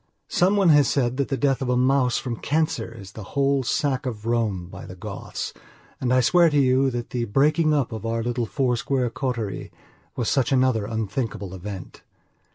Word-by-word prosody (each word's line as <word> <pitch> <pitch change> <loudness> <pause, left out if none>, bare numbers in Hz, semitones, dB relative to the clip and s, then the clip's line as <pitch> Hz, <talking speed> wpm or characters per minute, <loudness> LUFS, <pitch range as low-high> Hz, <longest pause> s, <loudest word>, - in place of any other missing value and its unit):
Some 185 +3 +3
one 195 -4 +4
has 145 -3 +6
said 125 -2 0
that 140 - 0
the 135 - -1
death 135 +1 +1
of 130 - -2
a 125 - +2
mouse 130 -1 +3
from 120 -3 -3
cancer 150 -6 -1
is 100 -4 -11
the 110 - -9 0.2
whole 140 0 +3
sack 135 0 0
of 110 -3 -5
Rome 110 -6 0
by 90 - -10
the - - -9
Goths, - - -6 0.5
and 125 -1 -1
I 130 0 +5
swear 170 +7 +5
to 145 -1 +2
you 135 0 +3
that 120 -2 -5
the 120 -2 -1
breaking 150 +8 +3
up 140 -5 +1
of 110 -2 -6
our 115 0 -1
little 120 -1 -1
four 130 -2 0
square 125 0 -1
coterie 125 -5 -3 0.4
was 120 - -2
such 135 -3 +1
another 130 -5 +2
unthinkable 110 -3 -3
event. 95 0 -8
125 Hz, 195 wpm, -24 LUFS, 115-140 Hz, 0.5 s, has